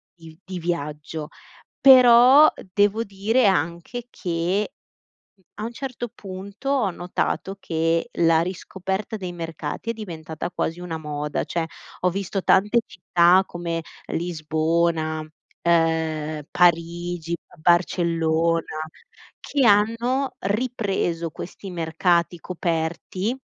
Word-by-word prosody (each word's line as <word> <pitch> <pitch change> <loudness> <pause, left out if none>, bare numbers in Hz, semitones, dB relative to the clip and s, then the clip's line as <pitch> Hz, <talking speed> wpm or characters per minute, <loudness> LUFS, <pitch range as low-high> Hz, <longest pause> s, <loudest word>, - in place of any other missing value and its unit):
di 165 -2 -14
di 185 -2 -6
viaggio. 150 -2 -4 0.5
Però 255 +3 +8 0.2
devo 205 +3 +3
dire 210 +4 +1
anche 170 +7 -1
che, 180 +2 -1 0.7
uhm, 190 - -31
a 210 - -6
un 235 - -4
certo 250 -1 -5
punto 195 +5 -8
ho 255 -8 +2
notato 180 +2 -2
che 165 0 0
la 165 -1 +4
riscoperta 190 +3 -4
dei 185 -4 -5
mercati 165 +4 -5
è - - +1
diventata 165 -7 -6
quasi 170 -1 -2
una 175 -2 -4
moda. 150 -1 -3
Cioè, 170 -1 -2 0.4
ho 180 - +4
visto 195 +1 -3
tante 210 +5 +4
città 180 +1 +4
come 170 -2 -4 0.3
Lisbona, 160 -1 0 0.4
uhm, 160 -2 +1
Parigi, 170 0 +1
b - - -8 0.2
Barcellona 165 -2 +1 0.6
che 280 -2 0
hanno 230 +6 +2
ripreso 200 -6 -1
questi 185 +5 -8
mercati 170 0 0
coperti 175 +6 -2
175 Hz, 105 wpm, -23 LUFS, 165-205 Hz, 0.7 s, Però